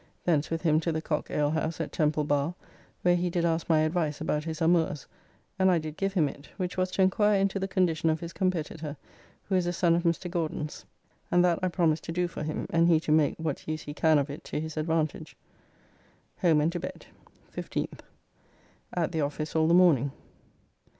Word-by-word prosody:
Thence 155 -4 +2
with 165 0 -3
him 155 -2 +4
to 165 +1 -1
the 160 - -1
Cock 155 -1 -2
alehouse 155 +2 0
at 160 - -3
Temple 150 -1 +1
Bar, 145 +3 0 0.5
where 175 0 +4
he 175 0 0
did 170 0 0
ask 165 0 0
my 155 -2 +4
advice 155 -2 0
about 150 -1 -1
his 160 -1 -4
amours, 165 -4 +2 0.5
and 190 0 +5
I 180 - +4
did 155 -1 -5
give 195 +2 -1
him 160 -5 +3
it, 140 +1 -10
which 180 -2 -3
was 185 0 0
to 190 - +3
enquire 205 +2 +3
into 195 0 +1
the 195 - -2
condition 170 -4 +1
of 160 0 +1
his 170 +1 -7
competitor, 160 -4 -2 0.5
who 195 - -5
is 180 -2 +2
a - - +1
son 170 -1 +3
of 170 - +2
Mr. 170 +1 0
Gauden's, 160 -3 -3 0.4
and 175 0 +4
that 175 -2 +2
I 185 - +1
promised 165 -3 +1
to - - -4
do 175 +1 0
for 170 - -7
him, 155 0 -3
and 165 0 +4
he 165 -2 +5
to 155 - -3
make 155 -2 +3
[what] 160 -3 -4
use 155 0 -3
he 145 - -6
can 160 0 +3
of 140 0 0
it 145 - -8
to - - -3
his 160 0 -5
advantage. 155 -1 -2 1.0
Home 160 -4 +4
and 160 +3 +2
to 175 - -3
bed. - - -7 0.5
15th. - - -4 1.0
At 175 -1 0
the 160 -2 -1
office 150 +2 -3
all 160 0 +3
the 170 - +5
morning. 150 -7 +5
160 Hz, 210 wpm, -28 LUFS, 155-175 Hz, 1.0 s, and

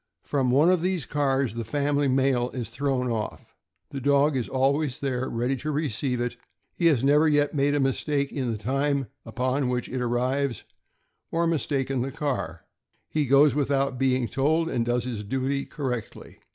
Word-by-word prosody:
From 135 -3 0
one 145 +8 +5
of 180 -3 +2
these 180 -4 -1
cars 135 -4 0
the 115 0 -4
family 145 +3 0
mail 130 -2 +2
is 120 -3 -4
thrown 135 -2 -1
off. 110 -2 -5 0.4
The 135 - -5
dog 140 +2 +3
is 125 -3 -2
always 135 +2 +1
there 130 -2 -2
ready 120 +3 -1
to 150 +5 -4
receive 140 -4 -1
it; 120 0 -2 0.4
he 170 - -2 0.2
never 145 +3 +5
has 155 - +3
yet 145 0 +2
made 145 0 +2
a - - +1
mistake 140 +1 0
in 130 -4 -2
the 110 - -3
time 135 +4 -1 0.2
upon 130 +4 -1
which 125 -1 -1
it 130 - -5
will 125 -1 -1
arrive, 130 0 0 0.7
or 170 +1 +1
mis 165 -3 0
taken 135 -2 -1
the 135 +2 -3
car; 125 - -3 0.5
he 150 -3 0
goes 140 +1 +5
without 135 -2 0
being 130 -2 +2
told, 155 +8 +1
and 120 -2 -1
does 120 0 +1
his 120 -4 -4
duty 135 +5 -2
correctly. 125 -6 -5
135 Hz, 180 wpm, -26 LUFS, 125-145 Hz, 0.7 s, one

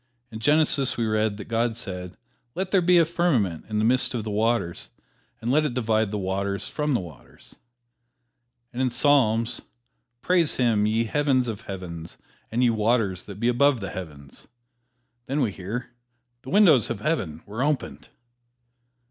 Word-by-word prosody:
In 110 - -7
Genesis 145 0 +2
we 115 - 0
read 110 -1 0
that 105 - -8
God 115 0 0
said, 90 -5 -6 0.4
"Let 185 +1 -3
there 195 - +4
be 180 +1 +4
a 165 - +5
firmament 135 - 0
in 105 - -2
the 105 - +2
midst 125 +2 +3
of 115 - -2
the 110 - -4
waters, 110 -4 -1 0.5
and 115 +2 -2
let 155 +3 +3
it 140 -5 -2
divide 110 -3 +1
the 105 - -3
waters 100 +1 -2
from 150 -2 -1
the - - +1
waters," 85 -7 -12 1.2
And 125 - -3
in 130 - +2
Psalms, 120 -3 +2 0.6
"Praise 175 -4 +2
Him, 115 -4 +2
ye 110 +2 +1
heavens 130 0 +1
of 110 -2 -4
heavens 90 -6 -8 0.3
and 120 +3 +1
ye 120 - +4
waters 110 -4 0
that 100 -1 -9
be 115 - +1
above 130 +2 +3
the 95 - -5
heavens." 75 -7 -10 0.8
Then 140 +3 -1
we 120 -7 +1
hear, 100 +6 -6 0.5
"The 130 - -10
windows 155 - +5
of 115 -3 -4
Heaven 95 - -2
were 110 +4 -5
opened." 145 0 -2
115 Hz, 165 wpm, -25 LUFS, 100-135 Hz, 1.2 s, a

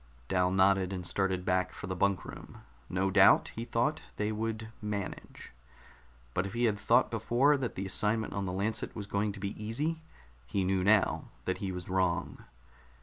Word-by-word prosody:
Dal 90 -1 +2
nodded, 95 0 +3
and 90 -2 -4
started 95 -1 -1
back 90 0 +1
for - - -7
the 95 -1 -3
bunk 100 +1 +1
room. - - -10 0.3
No 95 +1 0
doubt, 95 0 +6
he 115 - -4
thought, 145 +7 0
they 105 +1 -1
would 110 0 -3
manage. 105 -2 -5 0.8
But 90 +2 0
if 100 - -8
he 120 +1 -1
had 105 -3 +2
thought 120 +4 +3
before 120 +5 +3
that 130 -3 -3
the 95 - -3
assignment 105 +3 0
on 100 -1 -2
the 90 - -2
Lancet 105 +4 -2
was 105 - -5
going 100 +1 -1
to 100 - -9
be 100 +1 -3
easy, 150 +9 -2 0.5
he 95 +10 0
knew 95 0 +1
now 105 +1 +3 0.2
that 95 - -1
he 95 -2 -3
was 90 -2 -6
wrong. 95 -1 -1
100 Hz, 185 wpm, -31 LUFS, 95-110 Hz, 0.8 s, doubt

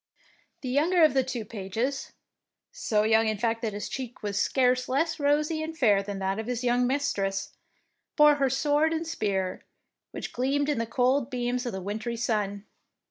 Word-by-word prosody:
The 255 - -4
younger 325 +6 +3
of 305 -4 +5
the 265 -1 +3
two 245 -4 -4
pages 225 +6 -3 0.3
— - - -61 0.2
so 220 - 0
young 220 +1 +3
in 215 -1 0
fact 230 +2 -1
that 220 -3 -2
his 205 - -4
cheek 250 -4 -6
was 200 -1 -1
scarce 255 -1 +2
less 320 +5 0
rosy 300 +2 +1
and 320 +1 -5
fair 210 -8 +4
than 200 0 -5
that 195 +1 -2
of 220 - -5
his 250 0 -2
young 245 0 +2
mistress 205 -8 -1 0.3
— - - -51
bore 300 -1 +6
her 275 -2 +2
sword 295 +4 +2
and 325 +1 -2
spear, 200 - -2 0.5
which - - -7
gleamed 280 +4 0
in 290 - 0
the 230 - -2
cold 255 +2 +1
beams 245 -1 -2
of 240 - -3
the 190 -1 -5
wintry 220 +4 -4
sun. 210 -3 -1
245 Hz, 190 wpm, -27 LUFS, 215-285 Hz, 0.5 s, bore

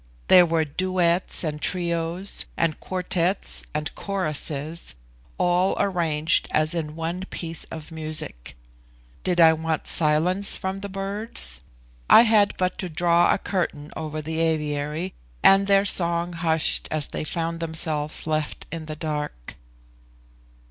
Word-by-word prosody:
There 180 -1 +8
were 160 -1 +1
duets 180 +3 0
and 150 -2 -3
trios, 170 +2 0
and 165 -2 0
quartetts 185 0 -1
and 150 -1 -3
choruses, 155 - -3 0.4
all 180 +2 +2
arranged 165 -4 +1
as 155 +2 +1
in 155 -3 -3
one 170 +3 -3
piece 165 -1 -2
of 160 0 -9
music. 155 - -6 0.7
Did 180 -1 0
I 165 -1 +8
want 160 0 -2
silence 170 +6 +2
from 190 +1 -3
the 200 +1 -6
birds? 195 - -2 0.5
I - - +9
had 215 -3 +3
but 185 0 -1
to 185 - -2
draw 170 +1 +3
a - - +3
curtain 165 -7 -3
over 155 -1 -5
the 160 +1 -3
aviary, 155 +1 -1 0.3
and 195 0 +6
their 200 0 +4
song 170 -2 0
hushed 165 -1 +1
as 155 -2 0
they - - -4
found 165 +1 -3
themselves 160 -2 0
left 155 -1 -2
in 160 -1 -6
the 155 - -5
dark. 150 - -5
165 Hz, 135 wpm, -24 LUFS, 155-180 Hz, 0.7 s, I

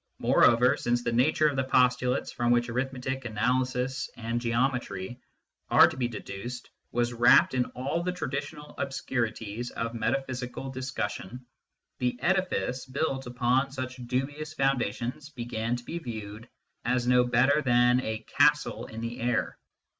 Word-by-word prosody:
Moreover, 120 +2 +4
since 120 0 0
the 115 - 0
nature 150 +6 +3
of 145 - -1
the 135 - +1
postulates 125 0 +2
from 120 0 -1
which 120 0 +3
arithmetic, 130 +1 -3
analysis, 125 +3 0
and 115 +1 -2
geometry 120 -3 -1 0.5
are - - +8
to - - -5
be 125 -2 0
deduced 120 +2 -7 0.2
was 120 0 0
wrapped 120 +2 +6
in 125 -1 +2
all 135 +7 -1
the 180 +1 -1
traditional 150 -2 -5
obscurities 120 -4 -3
of 115 0 -4
metaphysical 130 +1 -3
discussion, 125 -3 -5 0.5
the 125 -1 0
edifice 170 -6 0
built 135 -1 -2
upon 125 +2 +1
such 130 -1 -5
dubious 145 +5 -3
foundations 135 +1 -1
began 120 -3 -3
to 120 - -7
be 170 +7 -5
viewed 110 -4 -7 0.3
as 125 +1 +1
no 125 0 +5
better 125 +5 +3
than 125 -1 +4
a 110 -2 -4
castle - - +3
in 110 +1 -7
the 115 +1 -5
air. 120 +1 0
125 Hz, 140 wpm, -28 LUFS, 120-135 Hz, 0.5 s, are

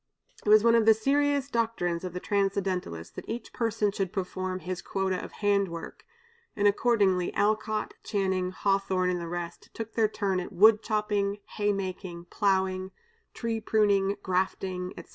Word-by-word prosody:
It - - -1
was 215 0 +7
one 230 0 +5
of 230 -1 +4
the 220 - +8
serious 280 +4 +1
doctrines 225 -9 -1
of 180 -2 -5
the 180 - -3
Transcendentalists 190 - -1
that - - -9
each 230 0 -5
person 225 -3 0
should 195 -2 -2
perform 185 -1 -3
his 180 +2 -4
quota 190 -1 -2
of - - -8
hand 200 -1 +1
work, 170 -1 -8 0.5
and 205 0 +3
accordingly 200 -4 +2
Alcott, 215 +1 0
Channing, 190 -3 0
Hawthorne, 190 -1 +1
and 175 -1 -2
the 170 - -5
rest, 175 0 -6
took 225 -1 -6
their 225 -2 +3
turn 200 -3 -1
at 180 - -6
wood 210 +3 +6
chopping, 210 -2 0
hay 205 -1 0
making, 185 -3 -5
plowing, 190 -2 +1 0.5
tree 230 -1 -2
pruning, 200 -2 +2
grafting, 185 0 -1
etc. - - -10
200 Hz, 160 wpm, -28 LUFS, 185-215 Hz, 0.5 s, the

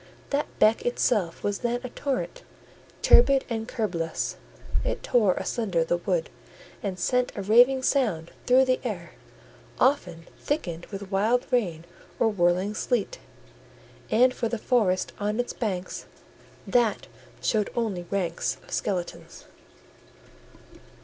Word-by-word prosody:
That 285 +1 0
beck 215 +1 +4
itself 210 -7 0
was 205 -1 -1
then 240 0 -1
a 250 - -5
torrent, 280 - -3 0.6
turbid 270 +2 +6
and 225 -1 -2
curbless: 175 -10 -2 0.5
it - - -2
tore 210 -7 +3
asunder 195 -8 -1
the 175 +1 0
wood, 175 -2 -1 0.5
and 195 -3 -3
sent 250 +7 +1
a 200 - -4
raving 245 +6 +5
sound 210 - +1 0.2
through 260 +1 +6
the 255 0 +2
air, 185 -9 -4 0.7
often 180 - +1
thickened 175 - -3
with 195 -1 -8
wild 220 +6 +2
rain 175 -10 0 0.3
or 225 - +4
whirling 185 0 +1
sleet; 245 - -1 0.9
and 250 +3 +4
for 230 -3 -2
the 235 - -2
forest 210 -5 +1
on 210 +2 -1
its 245 - -1
banks, 190 -6 -4 0.6
that 240 -4 +2 0.3
showed 215 -2 +1
only 200 -7 -2
ranks 180 -4 -1
of - - -17
skeletons. 185 -4 -4
215 Hz, 125 wpm, -26 LUFS, 180-245 Hz, 0.9 s, turbid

